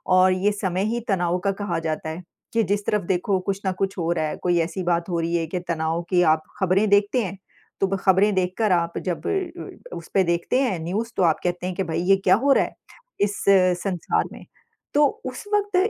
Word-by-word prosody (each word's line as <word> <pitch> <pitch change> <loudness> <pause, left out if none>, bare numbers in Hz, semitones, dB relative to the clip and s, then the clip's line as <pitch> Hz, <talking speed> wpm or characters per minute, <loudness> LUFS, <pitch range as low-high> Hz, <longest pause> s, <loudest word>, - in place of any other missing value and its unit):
और 185 0 +5
ये 195 +3 +1
समय 190 -1 -1
ही 240 - -1
तनाव 180 -2 +1
का 200 - +3
कहा 195 -4 -3
जाता 160 -1 -3
है 170 +3 -6 0.3
कि, 225 -1 +3
जिस 205 +2 -1
तरफ 210 -3 +1
देखो 190 +1 +1
कुछ 195 0 -1
ना 190 - +2
कुछ 195 +1 -2
हो 170 0 0
रहा 160 -2 -1
है। - - -4
कोई 175 -1 +2
ऐसी 170 +3 -3
बात 170 +1 0
हो 170 -1 0
रही 170 +1 -1
है 165 - -1
कि 180 +2 -3
तनाव 165 +1 -1
की 180 -2 +3
आप 155 0 -3 0.2
खबरें 190 +3 +2
देखते 205 +4 +3
हैं 195 0 -5 0.4
तो 195 - +3
ब 195 0 -1
खबरें 195 +2 +4
देखकर 185 +3 0
आप 170 -1 0
जब 175 -2 -3
अ, 395 +5 -5
उसपे 195 - 0
देखते 170 +9 +1
हैं 195 -11 0
न्यूज़ 220 +7 -3
तो 185 - +3
आप 160 -2 +3
कहते 175 0 -2
हैं 185 - -4
कि 190 - -1
भई, 165 0 -2
ये 195 +2 +4
क्या 185 +1 +6
हो 275 +6 +2
रहा - - +3
है - - -10 0.5
इस 205 0 0 0.4
संसार 185 -4 0
में। - - -12 0.5
तो 295 0 +5 0.2
उस 255 -1 -5
वक़्त 410 -2 +1
185 Hz, 225 wpm, -23 LUFS, 175-205 Hz, 0.5 s, क्या